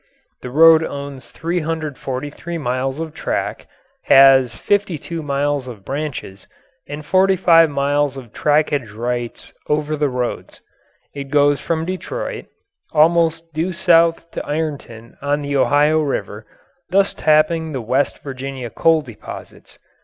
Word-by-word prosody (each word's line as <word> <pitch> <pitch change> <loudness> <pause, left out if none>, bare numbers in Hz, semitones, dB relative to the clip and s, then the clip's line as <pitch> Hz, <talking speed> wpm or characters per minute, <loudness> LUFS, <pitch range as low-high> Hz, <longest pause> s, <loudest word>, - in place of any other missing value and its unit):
The 125 - -6
road 160 +4 +6
owns 140 -3 -7
343 160 -2 -4
miles 130 0 -2
of 160 -1 -5
track, - - -3 0.4
has 135 -3 +6
52 170 - -1
miles 145 -2 -1
of 110 -6 -10
branches, 135 -9 -5 0.4
and 145 +1 -7
45 185 -3 +4
miles 140 0 0
of 120 -4 -11
trackage 145 -7 0
rights 120 +1 -4 0.2
over 150 0 0
other 150 -1 0
roads. 125 -1 -4 0.5
It 140 -1 -6
goes 145 0 +3
from 160 -1 -2
Detroit 185 - -5 0.5
almost 165 +1 +2
due 165 +5 -2
south 170 -2 +3
to - - -5
Ironton 145 -7 -5
on 145 +1 -1
the 140 0 -3
Ohio 145 +3 +3
River, 145 -3 -4 0.4
thus 195 +1 +2
tapping 155 +1 +2
the 135 - -3
West 130 +5 -1
Virginia 130 -3 -6
coal 165 -2 +2
deposits. 120 -6 -11
145 Hz, 125 wpm, -19 LUFS, 135-165 Hz, 0.5 s, road